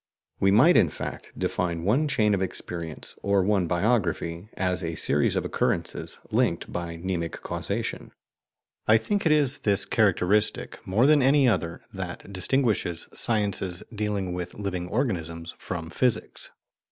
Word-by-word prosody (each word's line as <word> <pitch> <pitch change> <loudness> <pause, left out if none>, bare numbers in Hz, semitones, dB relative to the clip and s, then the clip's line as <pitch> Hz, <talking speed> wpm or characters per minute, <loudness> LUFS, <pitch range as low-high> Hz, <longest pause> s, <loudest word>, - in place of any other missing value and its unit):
We 95 - +4
might, 130 - +6
in 85 - +5
fact, - - -6
define 85 -2 -1
one 125 - +2
chain 110 -7 +2
of 95 - +1
experience, 85 -3 -5
or 100 -1 +2
one 95 -2 +2
biography, 90 -2 0
as 90 0 0
a 80 -1 -3
series - - +2
of - - 0
occurrences - - -1
linked - - +1
by 85 -1 -4
mnemic 85 -1 -2
causation. - - -3 0.8
I 110 - +7
think 200 - 0
it - - +4
is 145 -2 +3
this 100 -2 +1
characteristic, 105 -1 +1
more 105 +7 +3
than 150 0 +6
any 135 +1 +5
other, 85 -7 0
that 100 - -6
distinguishes 100 -4 0
sciences 100 -5 0
dealing 105 -4 -2
with 90 0 -5
living 90 -3 -3
organisms 85 - -2
from 85 -2 -5
physics. 120 0 0
95 Hz, 140 wpm, -26 LUFS, 85-110 Hz, 0.8 s, I